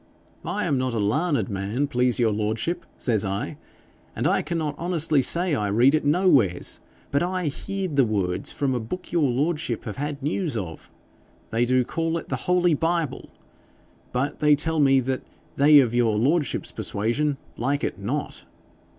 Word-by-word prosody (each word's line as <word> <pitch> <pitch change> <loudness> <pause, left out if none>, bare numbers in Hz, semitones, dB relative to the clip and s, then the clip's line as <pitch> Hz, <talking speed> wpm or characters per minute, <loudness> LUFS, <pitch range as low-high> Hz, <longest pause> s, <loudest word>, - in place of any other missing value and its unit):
"I 200 +5 -2
am 145 -7 +1
not 130 -2 -1
a - - 0
larned 145 - +1
man, 105 +6 -2
please 125 -3 +1
your 115 -3 +2
lordship," 110 +12 -2
says 110 -5 +1
I, 100 0 -3 0.6
"and - - -2
I - - +3
cannot 155 -2 -2
honestly 165 -4 +2
say 170 +5 +1
I 105 -7 0
read 120 +7 +4
it 155 - +2
nowheres, 145 - +2 0.3
but 140 - +2
I 180 0 -1
heerd 185 +1 -4
the 135 - +6
words 95 -5 -1
from 140 -2 -1
a 125 - 0
book 150 +12 -6
your 155 -6 +2
lordship 145 -1 -1
have 105 - -6
had 145 0 -4
news 155 - -1
of: 80 -6 -6 0.6
they 115 +2 +2
do 130 +1 +3
call 165 +3 -1
it - - -8
the - - -4
Holy 180 -2 +4
Bible. 165 -3 -1 0.8
But 135 +4 -2
they 150 -1 +5
tell 160 +2 -1
me 135 -2 +5
that 130 +1 -2 0.4
they 145 +1 +7
of 120 -4 +2
your 115 -3 +2
lordship's 145 +5 0
persuasion 135 +8 -1 0.2
like 140 +4 -1
it - - -2
not." 130 +9 -4
140 Hz, 170 wpm, -24 LUFS, 115-160 Hz, 0.8 s, they